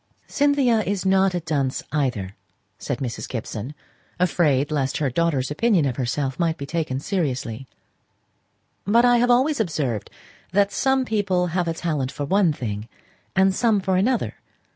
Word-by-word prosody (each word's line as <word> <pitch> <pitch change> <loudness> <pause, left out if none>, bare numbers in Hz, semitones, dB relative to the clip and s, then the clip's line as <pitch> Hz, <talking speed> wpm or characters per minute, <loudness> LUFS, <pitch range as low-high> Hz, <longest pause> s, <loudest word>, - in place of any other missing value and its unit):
"Cynthia 280 -5 +2
is 200 -2 -2
not 190 -1 +3
a - - +1
dunce 145 -5 -1
either," 125 -10 -1 0.4
said - - -3
Mrs. 125 -4 -5
Gibson, 115 +3 -5 0.4
afraid 150 -5 +2
lest 135 -3 0
her 140 -4 0
daughter's 145 -3 0
opinion 190 -1 +2
of 130 -3 -2
herself 135 +2 -2
might 165 -2 +1
be 140 - -5
taken 150 -3 -2
seriously. 135 - -3 1.2
"But 230 +5 +4
I 245 0 +5
have 245 +1 +2
always 265 +4 +3
observed 145 - -1 0.4
that 200 0 +3
some 265 -1 +1
people 200 -5 +1
have 180 -1 0
a 165 - -1
talent 150 -6 -2
for 145 +1 -4
one 190 +2 +3
thing 110 -6 -5 0.5
and 190 0 +4
some 220 -1 +2
for 190 -1 0
another. 230 +6 0
165 Hz, 155 wpm, -23 LUFS, 135-200 Hz, 1.2 s, I